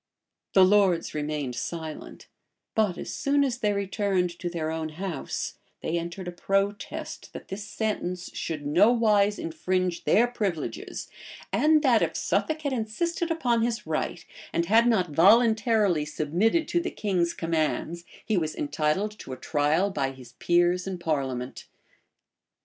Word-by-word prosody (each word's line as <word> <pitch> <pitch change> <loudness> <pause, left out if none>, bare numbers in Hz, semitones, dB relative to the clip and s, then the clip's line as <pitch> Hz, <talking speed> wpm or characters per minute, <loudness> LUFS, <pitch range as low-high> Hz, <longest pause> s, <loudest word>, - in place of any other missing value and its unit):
The 190 -1 +7
lords 190 -3 +3
remained 150 -3 -2
silent; 160 +3 -6 0.5
but 210 -5 +1
as - - -5
soon 285 0 +2
as 255 -3 -1
they 210 -3 +1
returned 200 -2 0
to 175 - -3
their 160 -2 -3
own 160 -1 -3
house, 170 -1 -4 0.2
they 160 - -2
entered 170 +2 -6
a - - -3
protest, 195 +3 -2
that - - -9
this 195 +2 -5
sentence 180 -5 -3
should 155 -3 -4
nowise 205 +4 +4
infringe 180 +2 -1
their 230 - +5
privileges, 210 -9 -3 0.5
and 310 0 +4
that, 245 -5 +4
if - - 0
Suffolk 315 0 0
had 285 -2 -1
insisted 335 +10 -2
upon 245 -8 +1
his 235 0 -1
right, 160 +2 -3 0.3
and 170 - 0
had 225 +5 +5
not 185 -8 +2
voluntarily 210 -1 +4
submitted 175 - +1
to 345 - +2
the 345 - -2
king's 180 -5 -1
commands, 165 +1 -1 0.2
he 215 -3 +1
was 155 -3 -1
entitled 155 +8 -1
to - - -7
a - - -7
trial 155 +8 +1
by 140 -6 -1
his 125 -3 -13
peers 175 +1 +2
in 190 -1 -3
parliament. 135 -7 -3
185 Hz, 145 wpm, -27 LUFS, 160-220 Hz, 0.5 s, The